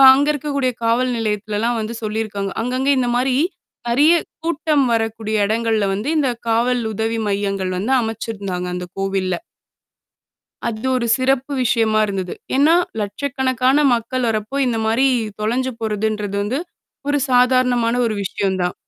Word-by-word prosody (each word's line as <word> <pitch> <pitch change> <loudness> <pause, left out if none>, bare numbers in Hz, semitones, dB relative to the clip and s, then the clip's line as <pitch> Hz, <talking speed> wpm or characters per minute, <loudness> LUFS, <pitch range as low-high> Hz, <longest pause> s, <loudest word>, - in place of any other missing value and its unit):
அங்க 285 +2 +2
இருக்கக்கூடிய 280 -3 -1
காவல் 245 +3 +2
நிலையத்துலலாம் 215 +1 -1
வந்து 220 +2 -4
சொல்லியிருக்காங்க. 210 -2 -3
அங்கங்க 255 +3 -1
இந்தமாரி 250 +1 +1 0.5
நிறைய 285 +8 +5 0.3
கூட்டம் 310 -3 +1
வரக்கூடிய 225 -1 -1
எடங்கள்ல 220 -1 +1
வந்து 210 +7 -3
இந்த 275 -3 +2 0.2
காவல் 240 +2 +2
உதவி 225 +2 -1
மையங்கள் 195 -2 -1
வந்து 225 +8 -1
அமைச்சிருந்தாங்க 205 -5 -4
அந்த 180 0 -4
கோவில்ல. 195 -1 -1 1.3
அது 220 +2 -4
ஒரு 235 -2 -1
சிறப்பு 270 +1 0
விஷயமா 220 -2 +2
இருந்தது. 190 -3 -3 0.2
ஏன்னா 300 +4 +5 0.3
லட்சக்கணக்கான 260 +4 +1
மக்கள் 240 +1 -1
வர்றப்போ, 220 +4 -2
இந்தமாரி 225 +2 +1 0.3
தொலைஞ்சு 255 +4 0
போறதுன்றது 210 -2 -2
வந்து. 225 +7 -1 0.5
ஒரு 290 0 +2
சாதாரணமான 250 -2 +3
ஒரு 220 - -1
விஷயம் 190 0 -1
தான். 180 - -1
230 Hz, 125 wpm, -20 LUFS, 210-255 Hz, 1.3 s, நிறைய